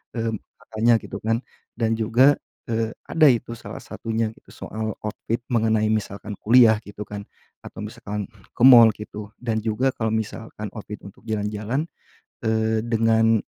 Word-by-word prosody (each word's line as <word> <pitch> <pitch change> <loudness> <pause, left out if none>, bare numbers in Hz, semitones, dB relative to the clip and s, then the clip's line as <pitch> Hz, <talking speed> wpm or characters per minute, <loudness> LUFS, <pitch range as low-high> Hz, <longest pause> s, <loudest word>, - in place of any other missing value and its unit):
mmm, 115 -1 -1 0.3
makanya, 115 +1 +2
gitu, 100 - -6
kan. 115 +1 +1 0.4
Dan, 115 -1 +1
juga, 120 +6 +5 0.3
eee, 115 -1 0
ada 155 -2 +4
itu 120 -2 +1
salah - - -9
satunya, 110 -1 -2
gitu, - - -23 0.2
soal 110 0 -4
outfit 115 +2 -3
mengenai 110 -1 +2
misalkan 105 -1 -3
kuliah, 115 -1 +6
gitu, 105 +1 -7
kan, 105 -1 -6 0.4
atau, - - -10
misalkan 105 -1 -5 0.3
ke - - -1
mall, 120 -3 +10
gitu, 105 0 -8
dan 115 -3 -1
juga 120 +4 +1
kalau 110 -1 -1
misalkan 110 -1 -5
outfit 105 -1 -7
untuk 100 - -13
jalan-jalan, 105 +6 -2 0.6
eee, 110 0 +1
dengan 115 -1 +3
110 Hz, 145 wpm, -23 LUFS, 105-115 Hz, 0.6 s, mall